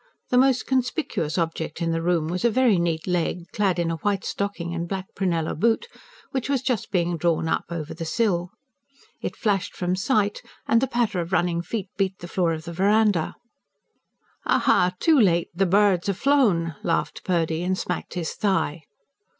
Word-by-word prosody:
the 250 - +4
most 260 -1 +3
conspicuous 250 - -1
object 165 -1 -2
in 165 -1 0
the 165 0 -1
room 170 -2 +1
was 180 +2 -3
a 235 - +5
very 235 -5 +3
neat 165 -2 -1
leg, 175 -1 -1
clad 195 -4 +1
in 170 -1 0
a 165 - -2
white 200 +4 -1
stocking 200 -4 -3
and 170 0 -3
black 190 -1 -3
prunella 170 -5 -1
boot, 230 - +1 0.4
which 265 0 -2
was 270 -3 +1
just 250 -5 -1
being 175 -2 0
drawn 165 0 +1
up - - 0
over 160 -3 -5
the 165 - -6
sill. 180 -1 0 0.7
It - - -4
flashed 200 -3 -1
from 180 0 -1
sight; 205 0 +1 0.3
and 230 - +4
the 265 - +1
patter 235 -6 0
of 170 +1 -6
running 175 -2 +1
feet 200 +1 -4
beat 190 -1 0
the 175 - -9
floor 175 -1 +1
of 160 -1 -4
the 170 +1 -7
verandah. 200 -1 +2 1.1
"Ha, - - +3
ha, 180 0 +3
too 315 -4 +4
late! 175 -6 +3
The 190 +2 +1
birds 195 -1 +3
have 200 -2 0
flown," 205 - +2
laughed 165 - -1
Purdy, 165 -3 0
and 185 +1 0
smacked 180 0 -4
his 170 -3 -2
thigh. 190 -6 0
180 Hz, 185 wpm, -24 LUFS, 170-210 Hz, 1.1 s, a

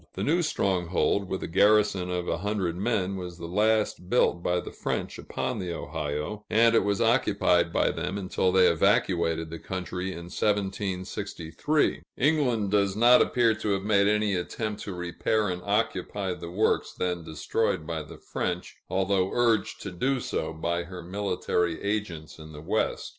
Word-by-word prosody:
The - - -3
new 170 +4 +2
stronghold, 95 - 0
with 95 - -3
a - - -3
garrison 100 0 +3
of 90 -1 -2
a - - -1
hundred 100 -3 -1
men, 100 -1 -1
was 90 -2 -7
the 85 - -7
last 105 0 +1
built 85 -7 +2
by 90 +1 +1
the - - -7
French - - -3
upon 125 -4 -3
the 90 -2 -3
Ohio, 75 +7 -4
and 115 +1 +5
it 115 - +4
was 100 +1 0
occupied 100 -7 +3
by - - +2
them 95 - -3
until 95 -1 0
they 95 0 +5
evacuated 85 -2 +2
the 85 - -6
country 90 0 -4
in 85 -2 -6
1763. 100 - -1 0.2
England 125 -8 +2
does 100 -2 +2
not 120 +3 +6
appear 120 -2 +3
to 105 -1 -1
have 95 0 -2
made 100 -1 +3
any 105 -1 +2
attempt 105 +4 -3
to 100 - -5
repair 90 +5 0
and 90 0 -3
occupy 100 -2 -1
the 85 -1 -8
works 105 +5 +1
then 90 -2 -2
destroyed 80 +2 -1
by 80 -1 -3
the 75 - -11
French, 90 0 -4
although 95 0 +1
urged 115 -3 +1
to 100 - -5
do 130 +9 0
so - - -3
by 85 +2 -2
her 90 0 -8
military 90 -2 -1
agents 100 -8 -3
in 80 0 -11
the 75 - -9
West. - - -1
95 Hz, 170 wpm, -27 LUFS, 85-105 Hz, 0.2 s, not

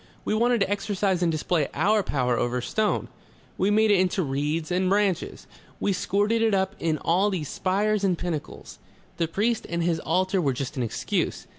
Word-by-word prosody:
We - - 0
wanted 235 +1 +2
to 195 - +2
exercise 195 -2 0
and 170 -2 +2
display 155 -1 0
our 210 +1 +3
power 125 -8 0
over 120 +1 0
stone. 210 - -1 0.5
We 190 - +1
made 215 +1 +4
it 200 - +4
into 185 +1 +1
reeds 150 +4 -2
and 185 +1 +1
branches. 195 -3 0 0.3
We 200 - +1
squirted 205 +5 +1
it 220 -3 +3
up 190 0 0
in 160 -2 0
all 185 +7 +2
these 170 -7 -3
spires 205 +2 0
and 185 -3 +2
pinnacles. 165 -4 -6 0.4
The 165 - 0
priest 215 +7 -1
and 170 0 -1
his 165 -1 +1
altar 185 +3 +1
were 140 -5 +1
just 135 +3 -5
an 130 - -2
excuse. 115 - -2
185 Hz, 185 wpm, -25 LUFS, 160-205 Hz, 0.5 s, made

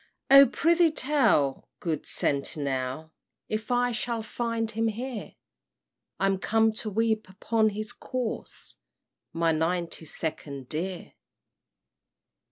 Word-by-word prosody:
"O 275 0 +10
prithee 335 +6 +3
tell, 255 - +2
good 160 -4 -3
sentinel, 140 +1 -1 0.4
If 215 0 -3
I 245 0 +2
shall 235 -1 -2
find 230 0 -2
him 225 +1 0
here? 230 0 -5 0.8
I'm 195 0 +2
come 225 +2 +3
to 215 - -3
weep 220 -1 0
upon 220 +3 +1
his 215 +2 -5
corse, 250 -1 -5 0.5
My 165 0 +2
Ninety 165 +1 -1
Second 140 -4 -4
dear! 175 +3 -4
215 Hz, 105 wpm, -27 LUFS, 165-235 Hz, 0.8 s, O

